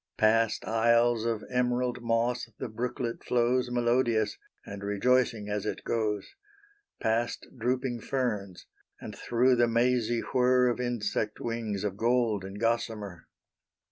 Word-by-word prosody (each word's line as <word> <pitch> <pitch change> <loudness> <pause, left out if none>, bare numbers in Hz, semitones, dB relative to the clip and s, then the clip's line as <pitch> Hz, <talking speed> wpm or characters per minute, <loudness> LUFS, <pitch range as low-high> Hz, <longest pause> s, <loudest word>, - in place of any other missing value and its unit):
Past 110 0 +2
isles 115 0 +3
of 115 -2 -1
emerald 125 0 0
moss 120 +1 0
the - - -5
brooklet 120 +1 -4
flows 125 +1 +1
Melodious, 120 -2 +1 0.3
and 100 0 -8
rejoicing 110 +1 +1
as 105 -1 -2
it - - -4
goes; 105 -3 -2 0.7
Past 115 +1 -1
drooping 125 0 -1
ferns, 105 -9 -3 0.3
and - - -8
through 125 +2 +2
the 120 0 +4
mazy 120 0 +1
whir 125 -1 +4
Of 120 - -2
insect 110 -3 -2
wings 115 -4 -3
of 100 -2 -2
gold 115 -3 +1
and 95 +2 -7
gossamer. 110 -5 -2
115 Hz, 125 wpm, -29 LUFS, 110-125 Hz, 0.7 s, the